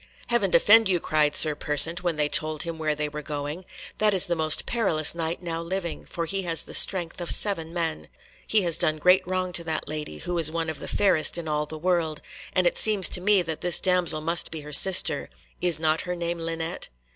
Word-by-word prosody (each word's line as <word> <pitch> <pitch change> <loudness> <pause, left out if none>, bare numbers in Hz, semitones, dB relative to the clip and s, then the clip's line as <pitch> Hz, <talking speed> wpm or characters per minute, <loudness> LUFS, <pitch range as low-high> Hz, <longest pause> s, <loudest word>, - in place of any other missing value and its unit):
"Heaven 235 -5 +1
defend 210 +5 +5
you," 180 -2 +1
cried 150 -2 0
Sir 155 -1 +4
Persant, 150 +4 +3
when 175 -2 -2
they 150 -1 0
told 155 +1 0
him 165 -1 -7
where 155 -1 -1
they 150 0 -3
were 150 0 -7
going; 150 +4 -6 0.3
"that 210 -2 +2
is 185 - +3
the 175 - -2
most 155 -1 +2
perilous 170 -10 0
Knight 165 +1 -4
now 165 -1 -4
living, 175 0 -6
for 170 - -4
he 195 +3 -4
has 165 -4 +1
the - - -12
strength 175 -2 +1
of 175 - -4
seven 165 -6 +1
men. 165 -2 -4 0.4
He 215 -2 +2
has 170 -2 0
done 155 0 +1
great 180 +4 +3
wrong 185 -1 -3
to 170 - -2
that 160 -1 -4
lady, 150 0 -6
who 175 +1 -4
is 160 -2 +4
one 165 -1 -3
of 155 - -9
the - - -8
fairest 185 -5 +1
in 170 -2 -6
all 150 0 -2
the 155 - -8
world, 165 -2 -1 0.3
and 185 - 0
it 175 - +1
seems 210 -4 +4
to 180 - +2
me 200 -1 +3
that 160 -2 -6
this 175 -1 +1
damsel 180 -4 +2
must 165 +2 -1
be 160 -1 -7
her 150 0 -10
sister. 190 +5 +5 0.3
Is 175 -2 +1
not 155 0 0
her 180 0 -5
name 170 0 -4
Linet?" 165 +1 -5
170 Hz, 225 wpm, -24 LUFS, 155-180 Hz, 0.4 s, defend